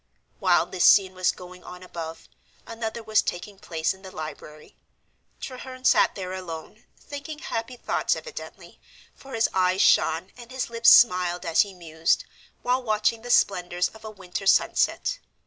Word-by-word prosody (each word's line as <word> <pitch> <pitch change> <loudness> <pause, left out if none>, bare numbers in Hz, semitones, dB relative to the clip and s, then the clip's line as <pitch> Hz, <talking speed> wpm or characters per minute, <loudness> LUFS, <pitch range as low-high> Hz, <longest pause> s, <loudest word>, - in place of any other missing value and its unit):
While 175 -3 +3
this 180 0 -2
scene 190 -2 +6
was 185 -1 +1
going 180 0 -13
on 180 0 -11
above, 165 -2 -8 0.4
another 230 0 -5
was 215 0 +3
taking 195 +3 -6
place 165 -3 -2
in 190 - -18
the 190 - -10
library. 155 -2 -9 0.6
Treherne 255 0 -8
sat - - +4
there 185 -2 -5
alone, 180 +3 -8
thinking 290 +1 -8
happy 240 -5 -5
thoughts - - 0
evidently, 485 - -10 0.3
for 270 -2 -10
his 225 - +3
eyes 185 0 +2
shone 165 +4 +3
and 240 -1 -13
his 260 -2 -4
lips 230 0 +5
smiled 180 -5 +5
as 165 +5 +4
he 200 -3 -3
mused, 165 -2 0 0.4
while 250 +1 +1
watching 215 -1 0
the 245 - -9
splendors 180 -5 +2
of 220 - -16
a 220 - -7
winter 195 -2 -6
sunset. - - +2
190 Hz, 160 wpm, -25 LUFS, 180-230 Hz, 0.6 s, scene